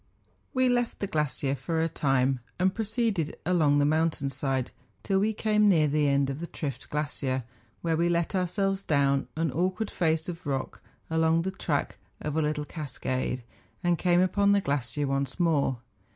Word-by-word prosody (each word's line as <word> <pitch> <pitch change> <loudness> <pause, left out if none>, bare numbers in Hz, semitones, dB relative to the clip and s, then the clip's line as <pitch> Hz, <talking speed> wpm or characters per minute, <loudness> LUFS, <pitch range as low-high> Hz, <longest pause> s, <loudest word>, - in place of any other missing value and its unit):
We 255 -1 +2
left 245 -1 0
the - - -1
glacier 150 -5 -1
for 160 +3 -2
a 165 - +2
time, 135 -4 +1 0.2
and 185 +1 +2
proceeded 220 -7 -1
along 160 -5 +3
the 145 - +4
mountain 155 -2 +1
side, 135 -2 -1 0.3
till 195 -1 +2
we 210 +3 +2
came 210 -1 +3
near 160 -5 +4
the 150 0 +2
end 140 -1 +2
of 135 - -5
the 170 - -5
Trift 140 -4 -5
glacier, 140 -3 -1 0.4
where 165 -1 +1
we 170 +2 +2
let 170 -1 0
ourselves 195 +1 0
down 140 -5 +2
an 160 -2 0
awkward 185 - -1
face 160 -2 0
of 175 -2 -6
rock 135 -2 -3 0.3
along 160 +1 +3
the 190 - -2
track 160 -6 -2 0.2
of 150 -1 -4
a 160 - +2
little 150 -1 -1
cas¬ 150 -4 -7
cade, 130 -1 -2 0.4
and 175 -1 +2
came 175 -1 +4
upon 200 +2 +3
the 200 - +3
glacier 140 -2 -1
once 135 +4 -2
more. 150 -7 +2
160 Hz, 180 wpm, -28 LUFS, 140-185 Hz, 0.4 s, the